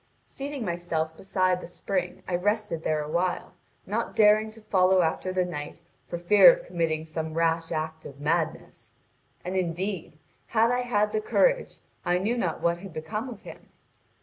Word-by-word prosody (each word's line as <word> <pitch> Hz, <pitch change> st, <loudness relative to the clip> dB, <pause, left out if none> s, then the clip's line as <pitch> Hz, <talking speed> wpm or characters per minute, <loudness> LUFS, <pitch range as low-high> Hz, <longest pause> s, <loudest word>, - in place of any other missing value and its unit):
Seating 275 Hz, -3 st, -5 dB
myself 170 Hz, -3 st, -2 dB
beside 185 Hz, 0 st, 0 dB
the -, -, -8 dB
spring 180 Hz, 0 st, -3 dB
I 185 Hz, -, -3 dB
rested 205 Hz, -2 st, 0 dB
there 155 Hz, -1 st, 0 dB
awhile, 175 Hz, +4 st, -1 dB, 0.3 s
not -, -, -2 dB
daring 215 Hz, 0 st, +5 dB
to 220 Hz, +1 st, -13 dB
follow 185 Hz, -2 st, +3 dB
after 165 Hz, +3 st, -1 dB
the 185 Hz, -1 st, +1 dB
knight 150 Hz, -3 st, -6 dB, 0.3 s
for 175 Hz, -, -4 dB
fear 205 Hz, -, +8 dB
of -, -, -4 dB
committing 160 Hz, -, -1 dB
some 160 Hz, 0 st, -4 dB
rash 165 Hz, 0 st, +1 dB
act 160 Hz, 0 st, -3 dB
of 140 Hz, 0 st, -13 dB
madness. 150 Hz, +3 st, -2 dB, 0.5 s
And, 185 Hz, +1 st, -3 dB
indeed, 180 Hz, -2 st, -2 dB, 0.3 s
had 230 Hz, +1 st, +3 dB
I 245 Hz, -, +1 dB
had 210 Hz, -4 st, +1 dB
the 215 Hz, 0 st, 0 dB
courage, -, -, +2 dB, 0.3 s
I 175 Hz, 0 st, +2 dB
knew 210 Hz, +6 st, 0 dB
not 175 Hz, -9 st, -2 dB
what 170 Hz, 0 st, +1 dB
had 190 Hz, -2 st, -10 dB
become 185 Hz, +11 st, -4 dB
of 230 Hz, -5 st, -10 dB
him. -, -, -12 dB
180 Hz, 170 wpm, -27 LUFS, 165-210 Hz, 0.5 s, fear